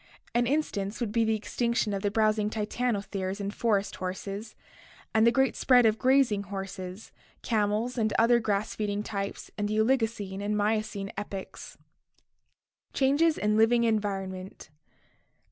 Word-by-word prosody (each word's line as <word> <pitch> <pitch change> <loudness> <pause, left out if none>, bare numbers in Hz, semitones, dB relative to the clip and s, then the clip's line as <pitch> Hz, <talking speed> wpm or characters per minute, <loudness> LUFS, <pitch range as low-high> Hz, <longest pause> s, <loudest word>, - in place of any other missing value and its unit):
An 240 0 +2
instance 230 -8 -1
would 235 -4 -2
be 230 +1 +2
the 220 0 +2
extinction 235 0 -1
of 195 - -2
the 205 - +1
browsing 215 0 +2
titanotheres 210 -3 -2
and 200 0 -3
forest 205 -4 0
horses 195 +4 -5 0.6
and 220 +1 +5
the - - +6
great 265 +1 +2
spread 250 -2 +5
of 220 0 +3
grazing 260 -6 +3
horses, 195 0 -7 0.3
camels, 220 +2 0
and 215 -1 +1
other 235 +1 +5
grass 210 -2 -1
feeding 205 -1 -2
types 200 -2 -5
in 205 - 0
the 215 +1 -1
Oligocene 220 -5 0
and 210 +1 -1
Miocene 210 -1 -1
epochs. 195 -2 -7 1.2
Changes 290 +4 +3
in 210 0 +1
Living 230 +2 +4
Environment. 195 -6 -2
215 Hz, 140 wpm, -28 LUFS, 200-235 Hz, 1.2 s, the